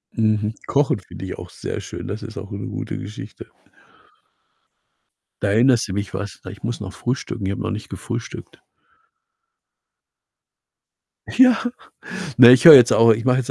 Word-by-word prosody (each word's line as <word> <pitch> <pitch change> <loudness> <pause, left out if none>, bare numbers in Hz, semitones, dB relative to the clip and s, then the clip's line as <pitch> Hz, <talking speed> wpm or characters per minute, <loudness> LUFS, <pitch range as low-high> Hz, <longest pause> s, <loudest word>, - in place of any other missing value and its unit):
Mhm. 110 -1 0
Kochen 140 0 +1
finde - - -11
ich - - -7
auch - - -10
sehr - - -7
schön. - - -9
Das 105 +2 -6
ist 110 - -10
auch 100 - -9
'ne 100 0 -6
gute - - -6
Geschichte. 105 +3 -10 1.9
Da 100 - 0
erinnerst 120 +2 +3
du 95 - -6
mich 100 -1 -5
was, 100 +2 -7
ich 100 - -13
muss 115 +2 -4
noch 100 -2 -8
frühstücken. 120 -4 -4
Ich 95 - -2
habe - - -5
noch - - -3
nicht 105 0 -7
gefrühstückt. 115 0 -8 2.8
Ja, 250 -1 +4 0.7
na, 120 -1 +9
ich 125 0 +5
höre 160 -3 +12
jetzt 125 -2 +5
au 115 0 +5
ich 115 +2 -3
mache 125 0 +2
jetzt 125 - -3
115 Hz, 160 wpm, -20 LUFS, 105-125 Hz, 2.8 s, höre